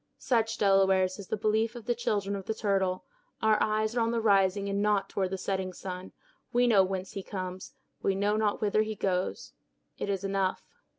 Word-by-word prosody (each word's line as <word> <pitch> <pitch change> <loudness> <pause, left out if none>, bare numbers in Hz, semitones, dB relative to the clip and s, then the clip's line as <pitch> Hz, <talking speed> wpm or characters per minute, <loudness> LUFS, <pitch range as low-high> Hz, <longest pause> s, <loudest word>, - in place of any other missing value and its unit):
Such, 225 -2 0
Delawares, 190 -1 +3
is 200 - -8
the 220 - -2
belief 220 +2 +1
of 235 -3 -9
the 240 - +1
children 210 -4 -1
of 195 -1 -7
the 220 - -1
Turtle. 190 -3 0 0.3
Our 220 -1 +3
eyes 215 +1 +1
are - - +2
on 230 0 +2
the 235 0 0
rising 200 -2 +3
and 200 0 -1
not 205 -2 +1
toward 190 -2 -1
the 190 - -3
setting 190 0 -2
sun. 185 +1 -7 0.4
We 245 +1 +3
know 215 -5 +5
whence 190 0 -3
he 200 - -5
comes, 185 -1 -6 0.3
but - - -3
we 195 - +3
know 205 +2 +1
not 215 -1 0
whither 215 0 +2
he 215 0 -2
goes. 185 -2 -2 0.5
It - - -3
is 195 -1 -1
enough." 195 -1 -1
200 Hz, 210 wpm, -29 LUFS, 190-215 Hz, 0.5 s, know